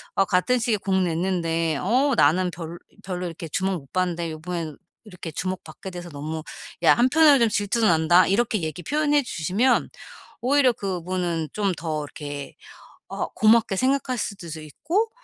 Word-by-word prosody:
아 195 - +4
같은 185 +8 +2
시기에 230 -2 +1
곡 195 -1 -1
냈는데 165 -2 0
어 270 +4 +2
나는 180 +1 +3
별 165 0 -7 0.3
별로 180 -1 -4
이렇게 165 -1 -7
주목 190 +3 0
못 135 -4 -14
받는데 175 -3 -1
요번에는 160 -1 -5 0.3
이렇게 180 -5 -8
주목받게 185 +1 -5
돼서 175 0 -7
너무 155 +2 -5 0.4
야 - - +7
한편으로는 280 +4 +5
좀 230 - +4
질투도 210 +2 +1
난다." 165 +2 +5
이렇게 215 0 +1
얘기 160 +2 -4
표현해 295 - +2
주시면 215 +7 +1 0.5
오히려 265 +1 +4
그분은 180 -4 -3
좀 200 -3 0
더 155 -2 -3
이렇게 145 -1 -7 0.5
어 - - -3
고맙게 220 -2 +3
생각하실 255 -1 0
수도 160 -2 -7
있고 330 - -1
185 Hz, 340 characters per minute, -24 LUFS, 165-230 Hz, 0.5 s, 야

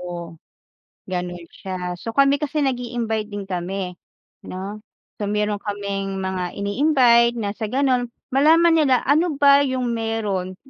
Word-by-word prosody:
Oo. 175 -1 -6 0.8
Gano'n 175 -1 -4
siya, 180 -2 -5
so 230 - -5
kami 275 +1 +4
kasi 300 0 -1
nag-i-invite 240 -4 -2
din 205 -1 -6
kami, 185 0 -4 0.6
'no. 195 +3 -6 0.4
So, 205 - -1
meron 210 0 -1
kaming 200 -1 -4
mga 190 -2 -3
ini-invite 235 +2 +3
na 205 -3 -2
sa 220 +1 -5
gano'n 255 -1 +1 0.2
malaman 325 +5 +5
nila 265 -4 +3
ano 310 +2 +2
ba 280 0 +6
yung 260 -3 0
meron 210 -5 -2
220 Hz, 135 wpm, -22 LUFS, 195-260 Hz, 0.8 s, ba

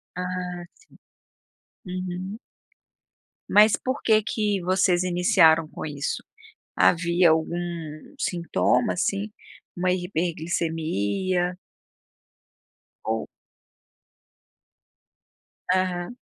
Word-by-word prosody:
Ah, 180 -1 -4
sim. 445 - -23 0.9
Uhum. 185 +2 -5 1.1
Mas 210 +1 +6
por 260 +2 -3
que 220 -1 +4
que 205 -4 -1
vocês 185 0 +2
iniciaram 175 -3 +4
com - - -7
isso? 145 -1 -3 0.5
Havia 170 0 +4
algum 160 +2 0 0.6
sintoma, 175 +6 +1
assim, 200 +3 -1 0.4
uma 180 +1 +1
hiperglicemia? 175 - -1 1.5
Ou. 110 0 -1 2.4
Aham. 185 +3 0
180 Hz, 70 wpm, -25 LUFS, 170-185 Hz, 2.4 s, Mas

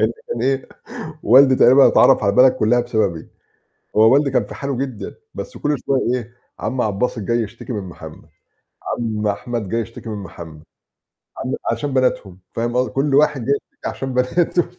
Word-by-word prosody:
إن - - +4 0.2
كان 470 - -3
إيه، 135 0 0 0.6
والدي 130 +3 +6
تقريبًا 130 +2 +6
اتعرّف 135 - +5
على 100 - +3
البلد 125 +4 +6
كلّها 120 0 +2
بسببي، 110 -9 -1 0.7
هو 110 +3 +6
والدي 140 -1 +3
كان 120 -5 +1
في - - -10
حاله 140 -2 -3
جدًا 130 -5 -5 0.2
بس - - -7
كل 150 0 0
شوية 135 -1 +2 0.2
إيه، 120 -1 -6 0.3
عم 130 -1 -2
عبدالباسط 110 +3 -1
جاي 115 +3 0
يشتكي 115 +3 -7
من 105 -3 -3
محمد، 80 -3 -11 0.7
عم 110 -2 -2
أحمد 105 +1 -3
جاي 115 +4 -1
يشتكي 115 +1 -8
من 105 - -4
محمد، 80 -3 -10 0.8
عم - - -3 0.2
عشان 145 -2 -3
بناتهم 105 -8 0 0.2
فاهم 120 +1 -2
قصد 125 0 +1
كل 135 +1 0
واحد 145 -4 +3
جاي 140 - +2 0.2
يشتكي - - -7
عشان 135 -1 -5
بناته 165 +8 +1
الف 180 - -6
120 Hz, 180 wpm, -20 LUFS, 110-135 Hz, 0.8 s, والدي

